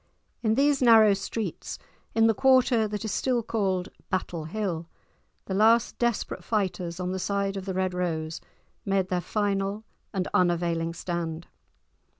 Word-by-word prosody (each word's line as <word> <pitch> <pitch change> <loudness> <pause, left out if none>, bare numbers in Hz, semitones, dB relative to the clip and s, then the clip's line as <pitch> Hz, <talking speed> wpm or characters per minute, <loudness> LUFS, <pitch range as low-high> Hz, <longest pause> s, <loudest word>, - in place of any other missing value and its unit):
In 220 -2 +2
these 280 +1 +3
narrow 225 -4 +7
streets, 200 +3 -4 0.4
in 225 0 +5
the 225 - +5
quarter 255 -2 +4
that 210 +1 -4
is 215 - -2
still 250 -3 0
called 190 -5 -1 0.2
Battle 175 -4 -2
Hill, 170 -2 -3 0.6
the 190 - -4
last 225 +4 +3
desperate 240 -2 -1
fighters 185 -5 -2
on 180 0 -2
the 190 - -3
side 200 +1 -1
of 195 -1 -5
the 190 -2 -3
Red 185 -1 0
Rose 160 -3 -2 0.4
made 195 -2 0
their 180 -1 0
final 200 +1 -1 0.3
and 190 -3 -2
unavailing 170 -2 +1
stand. 170 -1 -4
195 Hz, 150 wpm, -27 LUFS, 180-220 Hz, 0.6 s, narrow